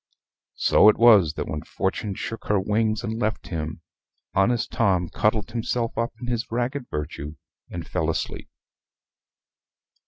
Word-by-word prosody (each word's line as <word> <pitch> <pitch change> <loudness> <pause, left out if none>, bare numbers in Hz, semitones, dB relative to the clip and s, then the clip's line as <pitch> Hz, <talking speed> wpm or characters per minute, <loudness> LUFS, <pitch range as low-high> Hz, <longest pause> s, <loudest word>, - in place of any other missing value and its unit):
So 105 - +6
it 105 - +3
was 105 -10 +6
that - - -3
when 75 - -3
Fortune 95 +1 -3
shook 115 - -6
her 105 -1 +3
wings 110 +2 0
and 110 0 -3
left 110 -1 -2
him, 80 -1 -4 0.5
honest 115 +5 +2
Tom 95 -6 +1
cuddled 110 0 0
himself 115 0 -2
up 115 +1 -1
in 125 - -6
his 120 -1 -2
ragged 125 +3 -2
virtue, 75 0 -5 0.3
and - - -6
fell - - -1
asleep. - - -3
110 Hz, 145 wpm, -24 LUFS, 95-115 Hz, 0.5 s, So